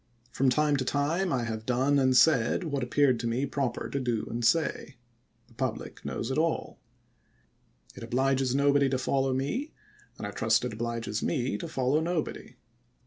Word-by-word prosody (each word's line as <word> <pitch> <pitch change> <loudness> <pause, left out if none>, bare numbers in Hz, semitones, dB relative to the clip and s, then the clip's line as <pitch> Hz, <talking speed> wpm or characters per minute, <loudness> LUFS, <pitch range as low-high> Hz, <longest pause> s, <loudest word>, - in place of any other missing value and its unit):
From 135 0 +2
time 145 +2 +2
to 130 - -1
time 155 +8 0
I 125 -3 0
have 110 -1 -4
done 130 +4 +2
and 130 -1 +3
said 140 +2 +4
what 145 -5 -2
appeared 130 0 +2
to 120 - -2
me 120 +4 0
proper 135 -3 -2
to 140 - -3
do 120 -4 -1
and 120 +1 -3
say. 145 0 +1 0.5
The - - -22
public 125 -1 -4
knows 120 - -3
it 130 - 0
aU. 165 0 -1 1.2
It - - -11
obliges 130 +2 +1
nobody 140 0 +3
to 130 - 0
follow 135 +1 0
me, 145 - -2 0.4
and - - -6
I - - -4
trust - - +1
it 125 - -4
obliges 115 -1 -3
me 130 -5 -1
to 170 - -5
follow 135 -1 +1
nobody. 165 -1 -3
135 Hz, 175 wpm, -28 LUFS, 120-145 Hz, 1.2 s, said